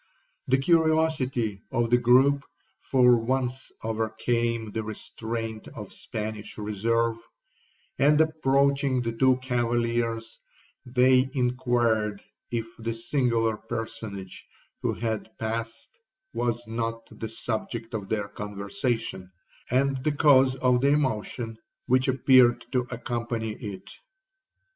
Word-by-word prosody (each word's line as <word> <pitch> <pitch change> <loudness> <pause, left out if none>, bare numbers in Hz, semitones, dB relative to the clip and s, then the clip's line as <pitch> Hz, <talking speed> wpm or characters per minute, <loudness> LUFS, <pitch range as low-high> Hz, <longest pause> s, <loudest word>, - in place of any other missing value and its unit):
The 130 0 +4
curiosity 155 - +2
of 120 0 0
the 120 - +5
groupe 130 +4 +5 0.4
for 125 -2 +5
once 130 +2 -2
overcame 115 0 -1
the 110 - -2
restraint 110 +1 -5
of - - -8
Spanish 110 -1 -6
reserve, 115 +2 0 0.8
and 150 +2 +5
approaching 140 -4 +2
the 115 - -1
two 130 +2 +3
cavaliers, 115 -2 -1 0.5
they 130 +1 +4
inquired 120 -5 +1 0.3
if 115 -2 -2
the 115 0 -3
singular 115 -3 +1
personage 110 -5 -6 0.3
who - - 0
had 110 -1 -4
passed 115 - -4 0.3
was 120 0 -1
not 115 0 -3
the 110 - -6
subject 115 +1 -4
of 105 -3 -4
their 105 -2 -1
conversation, 105 0 -3 0.4
and 135 +1 +1
the 150 - +1
cause 135 -3 +5
of 125 -2 +2
the 140 - +3
emotion 115 -4 -2 0.3
which 130 +2 +3
appeared 130 -2 +5
to 125 -2 0
accompany 115 -2 -3
it. 100 -3 -8
120 Hz, 110 wpm, -27 LUFS, 110-130 Hz, 0.8 s, the